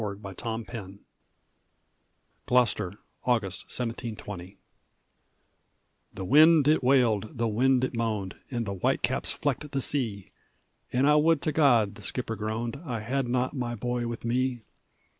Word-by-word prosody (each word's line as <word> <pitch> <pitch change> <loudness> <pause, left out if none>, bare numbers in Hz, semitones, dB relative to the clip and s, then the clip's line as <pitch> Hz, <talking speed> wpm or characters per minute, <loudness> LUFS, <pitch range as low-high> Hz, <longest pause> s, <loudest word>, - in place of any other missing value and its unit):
ALEC 100 -2 -3
YEATON'S 110 +4 -5
SON 100 -3 -7 1.5
GLOUCESTER, 120 -7 +2 0.3
AUGUST, 105 -8 +1
1720 105 -6 -5 1.5
The 95 - -6
wind 155 - +6
it 150 -2 +3
wailed, 125 -2 +2
the 115 0 +1
wind 125 +4 +2
it 130 - -1
moaned, 110 -5 -2
And 120 -3 -2
the 100 - -3
white 95 - 0
caps - - 0
flecked 150 - -2
the 140 -1 -2
sea; 115 -8 -1 0.6
"An' 130 +2 +2
I 150 +1 +5
would 160 +1 +4
to 155 - +1
God," 120 -10 +4
the - - -12
skipper 115 +2 -3
groaned, 115 +5 -3
"I 120 -8 -4
had 130 +4 -1
not 125 +2 0
my 120 -2 -2
boy 120 +1 -2
with 115 0 -6
me!" 125 0 0
120 Hz, 140 wpm, -27 LUFS, 110-130 Hz, 1.5 s, wind